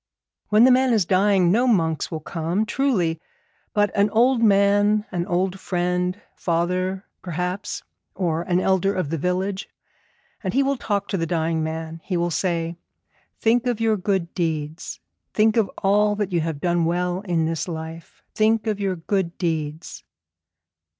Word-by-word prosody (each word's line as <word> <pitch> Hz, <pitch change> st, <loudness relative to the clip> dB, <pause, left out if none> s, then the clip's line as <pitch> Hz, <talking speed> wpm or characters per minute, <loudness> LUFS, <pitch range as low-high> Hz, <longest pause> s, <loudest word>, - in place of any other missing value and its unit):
When 215 Hz, +2 st, +6 dB
the 255 Hz, -, +7 dB
man 255 Hz, 0 st, +4 dB
is 210 Hz, -5 st, +3 dB
dying 190 Hz, -1 st, +3 dB
no 240 Hz, +6 st, +3 dB
monks 165 Hz, -9 st, +1 dB
will 160 Hz, -2 st, -5 dB
come, 170 Hz, +7 st, -1 dB
truly; 200 Hz, -, 0 dB, 0.5 s
but 205 Hz, -1 st, +2 dB
an 205 Hz, 0 st, +3 dB
old 235 Hz, +3 st, +3 dB
man, 205 Hz, 0 st, +4 dB
an 175 Hz, -1 st, -2 dB
old 185 Hz, +2 st, 0 dB
friend, 180 Hz, +1 st, -1 dB
father, 185 Hz, +3 st, -1 dB, 0.2 s
perhaps, 180 Hz, +3 st, -3 dB, 0.3 s
or 170 Hz, -3 st, 0 dB
an 175 Hz, +1 st, +1 dB
elder 190 Hz, +1 st, +2 dB
of 170 Hz, -5 st, -2 dB
the 165 Hz, -, -1 dB
village, 185 Hz, +4 st, -2 dB, 0.7 s
and 190 Hz, +2 st, -2 dB
he 275 Hz, -, +4 dB
will 275 Hz, +1 st, +1 dB
talk 205 Hz, -5 st, -2 dB
to 195 Hz, -, 0 dB
the 165 Hz, -1 st, -1 dB
dying 160 Hz, -1 st, 0 dB
man. 160 Hz, +1 st, -5 dB
He 185 Hz, -, -2 dB
will 170 Hz, 0 st, 0 dB
say, 170 Hz, -1 st, -1 dB, 0.6 s
"Think 235 Hz, +2 st, +2 dB
of 240 Hz, -3 st, 0 dB
your 225 Hz, -1 st, +2 dB
good 190 Hz, -3 st, -1 dB
deeds; 160 Hz, -2 st, -3 dB, 0.4 s
think 215 Hz, 0 st, +4 dB
of 220 Hz, -5 st, +2 dB
all 205 Hz, +1 st, +3 dB
that 205 Hz, -2 st, -2 dB
you 170 Hz, -2 st, +1 dB
have 160 Hz, -2 st, -3 dB
done 175 Hz, 0 st, +1 dB
well 180 Hz, +2 st, 0 dB
in 175 Hz, -5 st, 0 dB
this 165 Hz, +2 st, -2 dB
life. 160 Hz, -1 st, -8 dB
Think 220 Hz, 0 st, +2 dB
of 215 Hz, -2 st, -1 dB
your 195 Hz, -2 st, 0 dB
good 175 Hz, 0 st, -2 dB
deeds."' 160 Hz, -2 st, -3 dB
185 Hz, 165 wpm, -23 LUFS, 165-205 Hz, 0.7 s, the